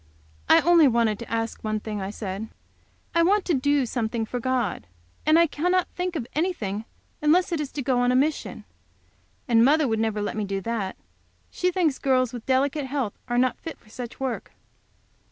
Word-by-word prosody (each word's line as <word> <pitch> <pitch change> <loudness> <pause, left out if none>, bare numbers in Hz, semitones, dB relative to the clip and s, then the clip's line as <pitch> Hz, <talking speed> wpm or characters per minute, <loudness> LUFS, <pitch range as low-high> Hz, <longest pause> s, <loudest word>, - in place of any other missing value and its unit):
"I - - +7
only 340 -3 +6
wanted 230 -4 +2
to 235 - -8
ask 225 0 -2
one 215 0 -1
thing," 210 -1 -5
I 190 - -3
said. 205 +1 -5 0.6
"I 335 - +4
want 390 +4 +3
to 350 - +1
do 285 0 +2
something 230 -1 -2
for 245 +3 -4
God. 255 - -1 0.4
And 310 +1 +6
I 335 - +6
cannot 355 +4 +1
think 360 0 -3
of 270 -7 -2
anything 225 - -2 0.4
unless 345 +5 +3
it 335 - 0
is 295 -2 -3
to 280 - -3
go 255 -1 +1
on 245 0 +3
a - - +2
mission. 295 +4 0 0.8
And 230 -2 +5
mother 295 +3 +4
would 220 -2 0
never 220 -1 0
let - - -3
me 215 - -1
do 195 -1 -2
that. 205 -2 -3 0.5
She 360 - 0
thinks 340 -6 +1
girls 255 -2 +2
with 240 -2 -8
delicate 270 +2 +1
health 260 -6 -2
are 240 0 -1
not 255 0 +2
fit 325 - -7
for 215 - -23
such 240 +1 -8
work." 260 -3 -4
255 Hz, 195 wpm, -25 LUFS, 225-305 Hz, 0.8 s, I